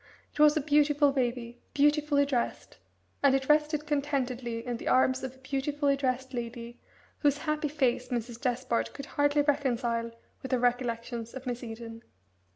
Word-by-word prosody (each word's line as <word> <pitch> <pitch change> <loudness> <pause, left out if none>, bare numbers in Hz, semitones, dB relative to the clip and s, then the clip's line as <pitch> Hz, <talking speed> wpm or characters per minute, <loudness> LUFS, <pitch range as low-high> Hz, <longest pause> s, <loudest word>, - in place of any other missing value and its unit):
It - - -11
was 300 +1 +6
a - - +2
beautiful 290 0 +3
baby 240 -2 -2 0.2
beautifully 295 0 +3
dressed, 255 -4 -2 0.4
and 275 -1 +5
it 265 -1 -1
rested 300 0 +2
contentedly 260 -5 -2
in 245 -1 -2
the - - -8
arms 260 0 +3
of 260 0 -5
a - - -20
beautifully 280 +2 0
dressed 260 -1 -2
lady, 235 0 -6 0.4
whose 290 -2 +3
happy 305 0 -1
face 260 -4 0
Mrs. 240 0 -4
Despard 250 -2 -1
could 280 - -6
hardly 290 +1 +2
reconcile 245 -5 0 0.3
with 265 - -4
her - - +4
recollections 235 -1 -1
of 265 0 -7
Miss 245 -1 -4
Eden. 225 0 -8
265 Hz, 160 wpm, -29 LUFS, 240-290 Hz, 0.4 s, was